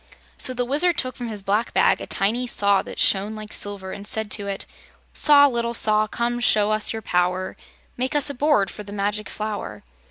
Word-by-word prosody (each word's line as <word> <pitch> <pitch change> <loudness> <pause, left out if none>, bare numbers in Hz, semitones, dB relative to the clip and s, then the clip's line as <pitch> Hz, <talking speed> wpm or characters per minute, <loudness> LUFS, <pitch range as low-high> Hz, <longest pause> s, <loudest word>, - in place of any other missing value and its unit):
So 255 - +1
the 245 0 -1
Wizard 305 +7 +2
took 255 -2 -3
from 245 - -6
his 210 -3 -4
black 205 +4 -1
bag - - +3
a - - -7
tiny 235 +6 -1
saw 200 -4 +2
that - - -10
shone 205 +2 +2
like 215 0 -8
silver 200 -2 0
and 205 0 -6
said 220 -1 +1
to 205 -1 -1
it: 195 -1 -4 0.5
"Saw, 290 -1 +6
Little 235 -3 -1
Saw, 215 -1 +2
come 240 +2 -2
show 215 -2 +3 0.2
your 225 -1 -6
power; 180 +1 -1 0.4
Make 260 +4 -2
us 295 -1 +4
a 285 - -1
board 275 -9 +1
for - - -9
the 205 -1 -11
Magic 205 +1 -2
Flower." 210 - -6
215 Hz, 200 wpm, -22 LUFS, 200-245 Hz, 0.5 s, Saw